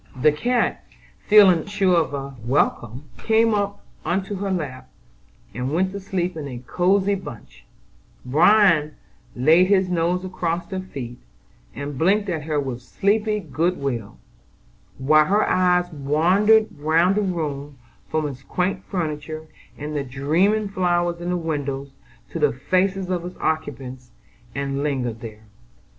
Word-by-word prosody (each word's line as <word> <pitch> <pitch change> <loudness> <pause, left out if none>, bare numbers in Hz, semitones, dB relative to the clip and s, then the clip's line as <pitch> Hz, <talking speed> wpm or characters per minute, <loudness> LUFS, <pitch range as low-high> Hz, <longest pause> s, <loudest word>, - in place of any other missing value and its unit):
The 150 +4 +5
cat, 240 +11 0 0.4
feeling 195 -6 +6
sure 200 -3 +2
of 165 -3 +1
a 140 0 -6
welcome, 125 +1 0 0.2
got 225 0 +4
up 200 -1 -2 0.2
into 190 +3 -1
her 200 +1 -3
lap, 150 -9 -4 0.6
and 125 +4 -3
went 185 +2 +1
to 200 - -5
sleep 185 -2 -2
in 150 -3 -5
a 125 -3 -6
cosy 185 +10 +1
bunch; 150 - -9 0.6
Bran 160 +1 +4 0.4
laid 160 +8 +5
his 190 -2 +3
nose 180 +1 0
across 175 -2 -3
her 190 - -2
feet, 135 -10 -7 0.6
and 140 -2 -5
blinked 200 +4 +2
at 160 -4 -3
her 155 -2 0
with 130 -3 -4
sleepy 210 - 0
good 175 0 -1
will, 120 -7 -4 0.8
while 155 +3 +4
her 205 +5 +2
eyes 180 -1 +2
wandered 180 +10 +3
round 165 +5 +3
the 210 - +1
room, 150 -7 -3 0.3
from 155 -1 0
its 135 -2 -8
quaint 185 +6 -2
furniture 155 -3 -4 0.3
and 150 +1 -5
the 145 - -1
dreaming 165 +11 +1
flowers 175 -3 0
in 175 - -3
the 180 - 0
windows, 140 -4 -3 0.4
to - - -4
the - - +3
faces 185 +7 0
of 175 -2 -1
its 180 +1 -8
occupants, 130 -5 -3 0.5
and 140 0 -2
lingered 130 -6 -2
there. 110 -2 -9
165 Hz, 145 wpm, -22 LUFS, 140-190 Hz, 0.8 s, feeling